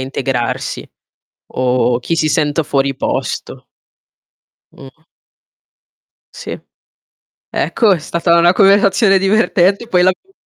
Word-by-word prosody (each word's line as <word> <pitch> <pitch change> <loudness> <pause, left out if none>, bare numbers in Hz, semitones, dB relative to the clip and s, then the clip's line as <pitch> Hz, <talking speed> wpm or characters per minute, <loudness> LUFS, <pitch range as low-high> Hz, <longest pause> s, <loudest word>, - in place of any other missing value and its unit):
integrarsi, 130 -2 -4 0.7
o 125 -1 0
chi 165 +7 -3
si 155 -1 0
senta 150 +1 0
fuori 140 -2 -1
posto". - - -4 1.1
Mh. 135 +3 -15 1.3
Sì. - - -7 0.9
Ecco, 225 -4 +1
è 170 - -3
stata 170 +2 0
una 175 +2 +4
conversazione 195 +1 +3
divertente 200 +1 +1
poi 180 -5 +1
l'abbiamo 185 - -1
170 Hz, 95 wpm, -15 LUFS, 135-195 Hz, 1.3 s, una